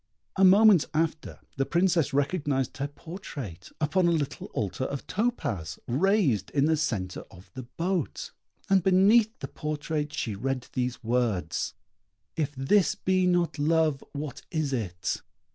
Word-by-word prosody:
A 195 - +2
moment 195 -2 +7
after, 160 0 -1 0.2
the 135 - +1
Princess 175 -3 +2
recognised 140 -2 0
her 140 - -2
portrait 145 - -8
upon 170 +4 +2
a - - +4
little 150 -4 -2
altar 105 +5 -3
of 140 0 -5
topaz, 200 - -2
raised 140 - +2
in 140 -1 +2
the 160 +1 +3
centre 110 -12 -2
of 90 +1 -16
the 130 -2 -8
boat; 175 -3 -2 0.4
and 195 -1 +4
beneath 200 +5 +5
the - - -4
portrait 150 0 -3
she 125 -7 -3
read 130 +4 -2
these 125 -1 -2
words. 110 -9 -1 0.6
"If 145 -3 -2
this 190 +10 +3
be 185 -2 +1
not 175 -3 +1
love, 155 -2 +2
what 145 -1 -5
is 155 -5 -1
it?" 90 -8 -2
150 Hz, 145 wpm, -27 LUFS, 130-180 Hz, 0.6 s, moment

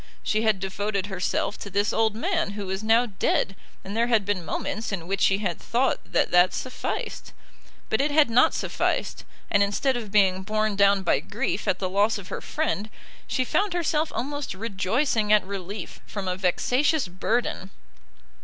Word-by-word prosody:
She 215 - +1
had 220 -3 +2
devoted 200 +1 -2
herself 195 +1 -2
to 200 - -7
this 200 +1 +1
old 220 -1 +2
man 330 - -1
who 205 -1 -5
was 190 +2 -3
now 225 +3 +4
dead, 195 -2 0 0.3
and 200 +2 -6
there 230 +1 +2
had 225 -4 +2
been 200 -3 -1
moments 215 +7 -3
in 180 -5 -4
which 195 +2 -2
she 195 - +4
had 185 -5 -2
thought 255 +3 +1
that - - +2
that 180 +1 +5
sufficed. 255 - -4 0.5
But 220 - +1
it 290 - +1
had 295 0 +5
not 235 +2 +4
sufficed, - - -1 0.3
and 200 - +4
instead 205 +7 +1
of 225 -4 -5
being 190 -2 +3
borne 215 +1 0
down 200 -1 +4
by - - +2
grief - - -3
at - - +2
the 185 - -2
loss 205 +4 +2
of 190 -2 -10
her - - -5
friend, 260 -9 -2 0.4
she 255 - 0
found 400 +8 +1
herself 320 -2 0
almost 285 -2 -3
rejoicing 215 +3 0
at 210 -3 +5
relief 195 0 -6
from 200 -2 -5
a 180 - 0
vexatious 250 - +1
burden. 190 +2 -2
205 Hz, 180 wpm, -25 LUFS, 195-240 Hz, 0.5 s, that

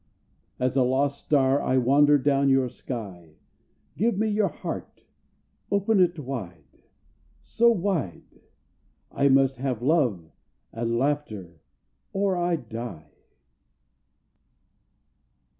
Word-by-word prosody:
As 125 0 -1
a 135 - +3
lost 135 +3 0
star 140 -1 +2
I 130 - +1
wander 145 +4 +5
down 140 0 +2
your 135 -2 +3
sky. 95 -12 -8 0.6
Give 225 +2 0
me 220 +2 +1
your 210 -1 +1
heart. - - -7 0.6
Open 200 +1 +2
it 175 -1 +3
wide 95 - -8 0.6
so 235 +1 +3
wide! 180 - -2 0.7
I 140 - +2
must 135 0 +3
have 125 -3 -3
love 125 - +1 0.4
and 115 0 -2
laughter, 110 - -3 0.5
or 195 -1 +1
I 175 -1 0
die. 115 - -8
135 Hz, 105 wpm, -25 LUFS, 115-165 Hz, 0.7 s, wander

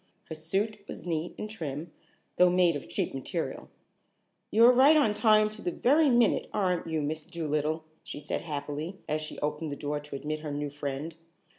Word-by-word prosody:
Her - - -4
suit 195 +7 -1
was - - -8
neat 165 -1 -2
and 215 - -4
trim, 160 -6 -5 0.5
though 180 0 +6
made 175 -2 +3
of 140 -6 -6
cheap 110 - -2
material. 135 -1 -4 0.8
"You're 230 +3 +7
right 275 +5 +7
on 225 -9 +3
time 215 -1 +5
to 215 0 -8
the - - -1
very 290 - +3
minute, 240 -2 +3
aren't 180 -4 0
you, 160 -2 -1
Miss 155 +1 -2
Dolittle?" 155 -2 -2 0.2
she - - -7
said 145 - -3
happily, 150 +3 -5
as 155 0 -1
she 155 - -7
opened 150 +1 -2
the - - -3
door 145 +1 -3
to 145 -1 -9
admit 150 +2 -3
her 155 0 -6
new 145 0 -3
friend. 145 +2 -4
160 Hz, 185 wpm, -29 LUFS, 150-205 Hz, 0.8 s, You're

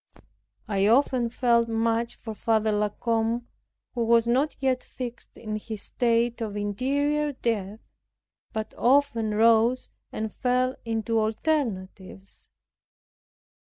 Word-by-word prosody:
I 200 -1 +1
often 245 0 +3
felt 235 -1 +2
much 230 +1 0
for 225 - -7
Father 220 0 +1
La 210 0 +1
Combe, 230 +2 -1 0.5
who 235 - -1
was 230 0 +3
not 265 +6 +1
yet 260 -2 +1
fixed 245 -2 -8
in 215 -2 -4
his 215 -1 -7
state 235 -1 0
of 210 -2 -3
interior 285 +8 0
death, 220 -4 -3 0.7
but 220 0 -4
often 240 -5 +2
rose 230 +3 +3 0.2
and 220 0 -4
fell 255 +1 +1
into 225 0 0
alternatives. 215 - -3
230 Hz, 115 wpm, -26 LUFS, 215-250 Hz, 0.7 s, often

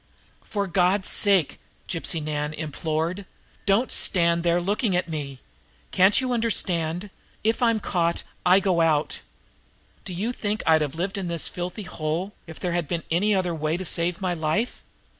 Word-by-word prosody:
"For 200 -2 -2
God's 185 +1 +2
sake," 195 -7 +3 0.3
Gypsy 165 -2 -2
Nan 150 0 -3
implored, 160 +5 -3 0.4
"don't 205 +6 +3
stand 170 -2 +3
there 170 0 +2
looking 200 +2 0
at 180 - 0
me! 140 -5 -5 0.5
Can't 190 +3 +5
you 255 -1 -1
understand? 185 -5 0 0.3
If 225 +3 +1
I'm 230 -2 +3
caught, 170 -4 0 0.2
I 180 +2 +6
go 185 -3 +2
out. 155 -2 +1 0.8
Do 185 - -6
you 215 +7 -1
think 215 -3 -2
I'd 160 -1 +5
have 145 -1 -2
lived 190 +4 -2
in 185 - -3
this 170 -2 -1
filthy 180 +4 -5
hole 165 +4 -3
if 160 - -10
there 180 - -2
had 175 -3 -1
been 170 +1 -2
any 200 +5 +3
other 180 -2 0
way 155 +1 -1
to 185 - -5
save 170 +1 +1
my 185 -2 -1
life? 170 +8 -1
175 Hz, 165 wpm, -25 LUFS, 160-200 Hz, 0.8 s, I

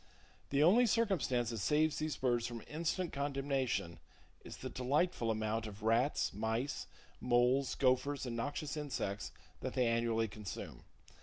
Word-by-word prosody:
The 140 +1 +3
only 230 +9 +6
circumstance 150 - +1
that 115 - -3
saves 150 - +2
these 155 -1 -2
birds 120 -2 +1
from 120 -2 -6
instant 170 +3 -2
condemnation 135 -9 -1 0.4
is - - -9
the - - -6
delightful 130 -1 +1
amount 110 0 -1
of 105 0 -10
rats, 115 +6 +2
mice, 110 +6 -2 0.3
moles, 125 +1 +2
gophers 130 +2 +2
and 120 -2 -3
noxious 145 +5 -3
insects 130 -9 -3 0.3
that - - -4
they 125 -2 +3
annually 115 -1 +1
consume. 105 -2 -7
125 Hz, 140 wpm, -35 LUFS, 115-145 Hz, 0.4 s, only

